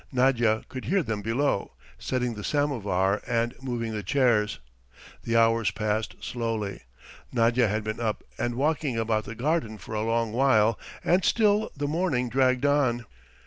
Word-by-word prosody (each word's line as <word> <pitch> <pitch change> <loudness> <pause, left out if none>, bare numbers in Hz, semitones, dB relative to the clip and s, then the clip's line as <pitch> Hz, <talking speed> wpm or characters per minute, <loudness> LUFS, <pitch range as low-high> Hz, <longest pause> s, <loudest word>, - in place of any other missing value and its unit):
Nadya 125 -4 +2
could 130 - -7
hear 195 -1 +2
them 110 -5 -3
below, 115 +1 0 0.3
setting 125 -2 -1
the 105 -1 -7
samovar 105 -10 0
and 115 +1 0
moving 120 -3 -3
the 105 -1 -3
chairs. 115 -1 +2 0.6
The 115 0 0
hours 115 -2 +3
passed 110 0 -2
slowly, 115 - -3 0.5
Nadya 120 0 +3
had 105 +1 -1
been 110 +1 -4
up 110 -2 -2
and 120 0 -2
walking 145 -2 0
about 110 -1 0
the 115 - -7
garden 130 -4 -1
for 110 - -9
a 105 - -1
long 115 0 0
while 115 -3 +3 0.2
and 180 +2 +3
still 215 -1 +2
the 145 0 -1
morning 150 -6 0
dragged 130 +1 +2
on. 130 -5 +2
115 Hz, 155 wpm, -26 LUFS, 110-135 Hz, 0.6 s, hours